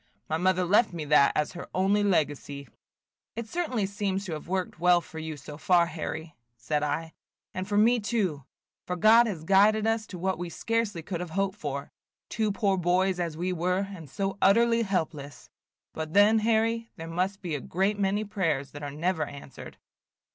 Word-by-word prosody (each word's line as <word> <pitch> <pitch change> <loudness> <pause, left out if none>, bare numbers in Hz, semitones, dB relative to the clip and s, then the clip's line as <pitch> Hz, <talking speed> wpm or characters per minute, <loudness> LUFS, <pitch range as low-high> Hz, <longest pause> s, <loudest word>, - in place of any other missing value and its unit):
My 160 - 0
mother 185 +1 +2
left 205 +2 +3
me 160 -3 -4
that 145 -1 +5
as 150 - 0
her 175 - -8
only 195 +3 +2
legacy." 145 -6 -1 0.7
"It 230 0 -5
certainly 255 - -1
seems 200 0 -2
to 180 - -6
have 155 - -7
worked 185 -2 -3
well 180 0 +5
for 160 -1 -10
you 160 -1 -5
so 145 +2 -10
far, 175 0 +4
Harry," 160 -1 -6 0.2
said 120 +6 -1
I, 155 +2 -2 0.4
"and 185 0 -4
for 205 0 0
me 235 +3 +5
too, 205 - -1 0.4
for 180 - -1
God 225 +6 +6
has 175 -8 -4
guided 205 +4 +4
us 225 -1 0
to 185 - -8
what 190 +1 -1
we 175 -1 -4
scarcely 220 -3 -2
could 175 +1 -4
have 180 -1 -5
hoped 195 +1 0
for, 140 -1 -4 0.4
two 220 -2 0
poor 200 -2 +1
boys 180 +1 +1
as 165 -3 -3
we 180 +2 -1
were, 180 +3 -1
and 165 -6 -10
so 195 +5 -3
utterly 230 +4 +4
helpless. 160 - -3 0.4
But 160 0 -5
then, 210 +2 +6
Harry, 230 +1 +1
there 165 - -8
must 185 +4 -2
be 170 -3 -3
a 145 - -2
great 195 +4 -1
many 200 +2 +1
prayers 165 -10 -1
that 145 - -9
are 145 - -4
never 160 +3 -1
answered." 140 -1 -11
185 Hz, 190 wpm, -27 LUFS, 160-205 Hz, 0.7 s, God